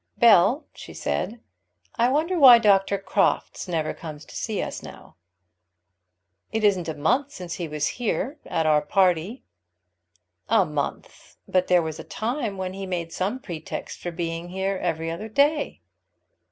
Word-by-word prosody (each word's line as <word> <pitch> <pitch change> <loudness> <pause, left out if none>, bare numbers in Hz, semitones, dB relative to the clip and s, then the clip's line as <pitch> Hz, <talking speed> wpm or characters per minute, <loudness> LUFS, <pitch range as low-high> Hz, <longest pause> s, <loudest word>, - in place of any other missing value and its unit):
"Bell," 235 - +5
she - - -11
said, 230 +2 -3 0.5
"I 240 +2 +3
wonder 325 +6 +1
why 255 -4 +10
Dr. 200 -3 +3
Crofts 195 - 0
never 160 -3 -1
comes 155 -2 -9
to - - -14
see 215 -3 -3
us - - -4
now?" - - -12 1.4
"It 220 -1 -1
isn't 185 -5 +2
a 160 - -3
month 250 - +1
since 180 -2 -6
he 170 - -2
was 150 -1 -1
here, 265 +5 -1
at 160 - 0
our 150 -1 +4
party." 180 - +1 1.1
"A - - +4
month! 150 -1 -5
But 185 -1 +1
there 180 -2 +4
was 160 -1 -5
a - - -6
time 225 -3 -3
when 185 -1 -4
he 195 0 -6
made 170 -2 -3
some 195 +7 -1
pretext 165 -9 -7
for 175 - -4
being 170 0 -4
here 190 +2 -2
every 165 -1 -2
other 210 +7 -6
day." 285 +6 +1
185 Hz, 155 wpm, -24 LUFS, 165-230 Hz, 1.4 s, why